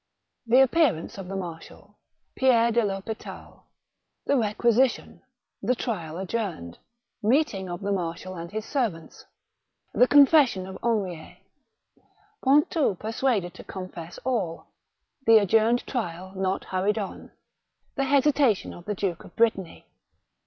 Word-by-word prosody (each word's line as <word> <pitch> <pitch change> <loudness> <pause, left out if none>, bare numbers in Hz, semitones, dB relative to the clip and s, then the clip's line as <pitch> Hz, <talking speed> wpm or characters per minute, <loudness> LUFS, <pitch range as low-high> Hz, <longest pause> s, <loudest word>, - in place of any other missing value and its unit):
The 250 +3 +6
Appearance 260 - +2
of 190 - -7
the 195 - -5
Marshal— 170 -4 -9 0.4
Pierre 235 -3 +4
de 235 +1 +3
THospital 205 +2 -6 0.3
— - - -43
^The - - +2 0.2
Requisi 240 +3 +4
tion - - -11 0.2
— - - -60
The 250 - +4
Trial 175 -10 -4
adjourned— 185 - -4 0.4
Meeting 215 - +1
of 175 +2 -5
the 200 0 -2
Marshal 180 0 -3
and 170 0 -7
his 215 +1 -4
Servants 220 - -3 0.4
— - - -49
The 250 - +5
Confession 280 - +5
of 190 0 -9
Henriet 195 -8 -2 0.5
— 425 +1 -37
Pontou 285 - +3
persuaded 220 -4 -1
to - - -11
con 185 -1 -7
fess 170 -1 -9
all 215 -10 -2 0.2
— 265 - -43
The 225 0 +8
adjourned 220 +3 +3
Trial 185 -6 -4
not 190 0 -1
hurried 190 +3 -1
on 200 -3 -6 0.3
— - - -47
The 275 - 0
Hesitation 275 -5 +2
of 175 - -12
the 210 - -3
Duke 185 -3 -3
of - - -15
Brittany. 215 -6 0
210 Hz, 145 wpm, -26 LUFS, 185-250 Hz, 0.5 s, The